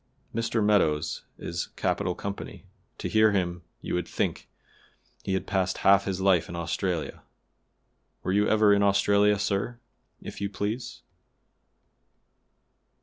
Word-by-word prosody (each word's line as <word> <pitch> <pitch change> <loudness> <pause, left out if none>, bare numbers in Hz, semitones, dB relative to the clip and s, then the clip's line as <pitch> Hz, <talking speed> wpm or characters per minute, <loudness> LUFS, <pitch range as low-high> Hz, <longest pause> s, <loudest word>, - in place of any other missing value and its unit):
Mr. 115 -1 0
Meadows 80 -7 +1
is 85 0 -4
capital 90 -1 -1
company; 100 0 -7 0.3
to - - -4
hear 110 -1 +4
him 90 -3 -1 0.2
you - - -4
would 90 -1 -1
think - - -2 0.7
he 95 - -1
had 95 - -2
passed 95 -1 0
half 100 0 +6
his 95 -2 -2
life 95 -3 +3
in 85 - -6
Australia. 85 0 -2 1.0
Were 95 - -1
you 105 +1 +3
ever 110 -1 +5
in 100 - +3
Australia, 100 +1 +4
sir, 100 +4 -2 0.4
if - - -9
you 100 - -1
please?" 105 +5 -4
100 Hz, 130 wpm, -27 LUFS, 90-105 Hz, 1.0 s, half